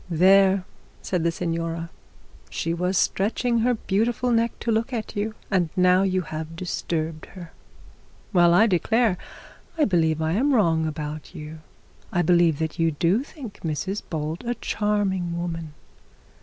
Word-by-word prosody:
'There,' 190 Hz, +2 st, +5 dB, 0.4 s
said 180 Hz, -3 st, -1 dB
the 170 Hz, -, +2 dB
signora. 165 Hz, -1 st, -3 dB, 0.6 s
'She 165 Hz, -, -2 dB
was 180 Hz, +2 st, 0 dB
stretching 230 Hz, +6 st, +1 dB
her 245 Hz, +2 st, +2 dB
beautiful 225 Hz, +4 st, 0 dB
neck 230 Hz, 0 st, +2 dB
to 230 Hz, -, -1 dB
look 225 Hz, +4 st, 0 dB
at 225 Hz, -2 st, -4 dB
you, 215 Hz, +1 st, -2 dB, 0.2 s
and 180 Hz, -4 st, +2 dB
now 180 Hz, 0 st, +4 dB
you 185 Hz, -1 st, +1 dB
have 160 Hz, 0 st, -6 dB
disturbed 165 Hz, -2 st, -3 dB
her. 175 Hz, -4 st, -11 dB, 0.8 s
Well 175 Hz, -2 st, +5 dB
I 205 Hz, +6 st, +6 dB
declare, 220 Hz, +2 st, +2 dB, 0.6 s
I 305 Hz, -, +4 dB
believe 160 Hz, -5 st, +2 dB
I 160 Hz, 0 st, 0 dB
am 265 Hz, -, +2 dB
wrong 165 Hz, -7 st, +2 dB
about 155 Hz, +2 st, -6 dB
you; 155 Hz, 0 st, -8 dB, 0.5 s
I 175 Hz, -1 st, +1 dB
believe 170 Hz, -2 st, +4 dB
that 160 Hz, +2 st, -3 dB
you 165 Hz, 0 st, +3 dB
do 170 Hz, -, +1 dB
think 265 Hz, -8 st, -10 dB
Mrs 180 Hz, +6 st, -2 dB
Bold 160 Hz, +2 st, -3 dB
a 240 Hz, 0 st, -2 dB
charming 195 Hz, -6 st, -1 dB
woman. 165 Hz, -2 st, -4 dB
180 Hz, 150 wpm, -24 LUFS, 165-210 Hz, 0.8 s, I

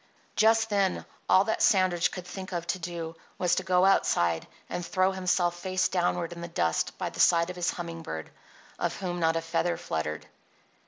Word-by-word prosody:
Just 225 Hz, 0 st, +4 dB
then 200 Hz, -2 st, +1 dB, 0.2 s
all 190 Hz, -, +6 dB
that 220 Hz, +2 st, -1 dB
Sandridge 185 Hz, -4 st, +4 dB
could 180 Hz, -2 st, -7 dB
think 185 Hz, +1 st, -7 dB
of 170 Hz, -1 st, -2 dB
to 185 Hz, -, -2 dB
do 165 Hz, -1 st, -5 dB, 0.2 s
was 180 Hz, -1 st, +1 dB
to 185 Hz, -, +1 dB
go 185 Hz, 0 st, +3 dB
outside 85 Hz, -, +2 dB, 0.2 s
and 175 Hz, -, -4 dB
throw 185 Hz, +2 st, +2 dB
himself 180 Hz, -2 st, 0 dB
face 185 Hz, +1 st, 0 dB
downward 175 Hz, -1 st, 0 dB
in 170 Hz, -, -9 dB
the 170 Hz, -, -5 dB
dust 85 Hz, -, -1 dB
by -, -, -3 dB
the -, -, -10 dB
side 170 Hz, 0 st, +4 dB
of -, -, -10 dB
his 175 Hz, -1 st, 0 dB
humming 170 Hz, -1 st, -5 dB
bird, 80 Hz, -, -6 dB, 0.5 s
of -, -, -1 dB
whom 175 Hz, -2 st, -3 dB
not 165 Hz, -1 st, +2 dB
a 165 Hz, -, 0 dB
feather 165 Hz, +1 st, 0 dB
fluttered. 75 Hz, -1 st, -3 dB
175 Hz, 195 wpm, -28 LUFS, 165-185 Hz, 0.5 s, all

